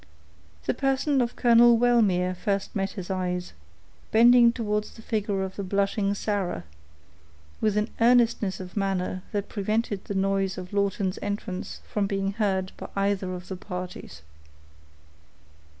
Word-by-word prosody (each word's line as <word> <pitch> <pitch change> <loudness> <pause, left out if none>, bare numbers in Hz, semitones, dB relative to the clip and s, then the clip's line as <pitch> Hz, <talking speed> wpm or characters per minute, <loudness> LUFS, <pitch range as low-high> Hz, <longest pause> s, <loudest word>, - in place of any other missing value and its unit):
The - - +1
person 270 +1 +1
of 240 0 -2
Colonel 235 -1 +6
Wellmere 210 -7 +3
first 195 +2 -2
met 195 -1 -1
his 190 -2 -6
eye, 180 -1 -1 0.7
bending 235 +1 +7
towards 210 -3 -2
the 225 - -12
figure 205 -4 -1
of 190 0 -6
the 200 - -3
blushing 200 +1 0
Sarah, 200 - -2 1.0
with 210 -1 +1
an 210 +1 0
earnestness 230 -4 +3
of 185 -1 -9
manner 190 -2 -1
that 205 -1 -2
prevented 210 0 -2
the 200 - -4
noise 195 0 0
of 185 +1 -8
Lawton's 200 -1 0
entrance 200 -2 -4
from 205 -2 -1
being 195 0 -1
heard 195 -3 -1
by - - -8
either 195 -1 0
of 180 0 -9
the 190 - -5
parties. 180 - -7
200 Hz, 140 wpm, -26 LUFS, 190-220 Hz, 1.0 s, bending